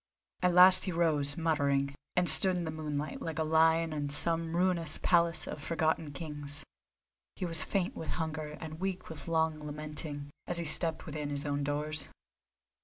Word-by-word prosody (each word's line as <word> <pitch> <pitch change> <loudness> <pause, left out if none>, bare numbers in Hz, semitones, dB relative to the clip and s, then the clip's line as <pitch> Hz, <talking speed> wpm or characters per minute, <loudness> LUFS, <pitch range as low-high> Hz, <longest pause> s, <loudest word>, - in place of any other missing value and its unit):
At 180 -1 +2
last 185 +2 +8
he 190 - -2
rose, 155 -3 0
muttering, 140 -4 +1 0.2
and 180 0 +2
stood 185 0 +7
in 175 - -2
the 160 - -3
moonlight, 150 -2 -4
like 165 -1 -4
a 160 - +1
lion 160 +1 +3
in 145 -1 -2
some 165 +3 0
ruinous 175 -3 +2
palace 170 -2 +2
of 145 - -6
forgotten 160 -1 0
kings. 145 -1 -6 0.7
He 185 - -3
was 165 -2 0
faint 185 +1 -1
with 160 - -6
hunger 155 -2 -4
and 160 0 -7
weak 190 0 -3
with 160 0 -9
long 160 -1 +1
lamenting, 150 -1 -5 0.2
as 175 - -1
he 170 - -2
stepped 160 +1 0
within 150 -2 -4
his 145 0 -3
own 145 0 -1
doors. 150 +1 -2
160 Hz, 175 wpm, -31 LUFS, 150-165 Hz, 0.7 s, last